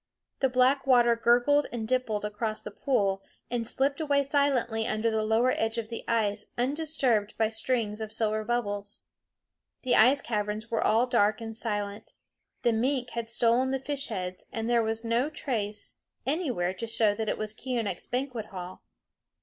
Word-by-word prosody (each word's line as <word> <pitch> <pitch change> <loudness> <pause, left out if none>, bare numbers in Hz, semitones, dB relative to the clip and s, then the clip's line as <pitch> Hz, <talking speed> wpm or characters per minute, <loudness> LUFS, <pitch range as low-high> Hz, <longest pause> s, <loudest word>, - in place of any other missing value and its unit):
The 265 - +2
black 255 +2 +3
water 240 -2 +5
gurgled 245 +5 +3
and 225 -2 -4
dimpled 230 -4 0
across 215 +1 -3
the 210 - -8
pool, 200 -6 0 0.3
and 235 -2 -1
slipped 275 +5 0
away 285 -2 +2
silently 265 -6 +1
under 225 0 0
the 220 0 +1
lower 220 +4 +3
edge 225 +1 -1
of 230 0 -4
ice 210 -3 0
undisturbed 255 -5 0
by 220 -1 +2
strings 220 -1 -1
of 220 -1 -5
silver 215 -1 0
bubbles. 205 -3 -3 0.8
The 250 - +3
ice 255 +6 +6
caverns 210 0 -3
were 225 - +1
all 225 +3 +4
dark 215 -4 +2
and 225 -1 -6
silent. 205 -2 -4 0.5
The 235 - +3
mink 250 +2 0
had 235 -1 -4
stolen 235 +2 +3
the 270 - +1
fish 280 +1 -3
heads, 185 -5 -5
and 225 0 -3
there 240 -1 +3
was 225 0 -2
no 235 +5 +1
trace 215 -9 -4 0.3
anywhere 255 - 0
to 230 +5 -5
show 225 -2 +2
that 220 0 -2
it - - -1
was 215 0 -3
Keeonekh's 230 -6 -3
banquet 250 -4 -3
hall. 185 -2 -8
230 Hz, 165 wpm, -28 LUFS, 215-255 Hz, 0.8 s, ice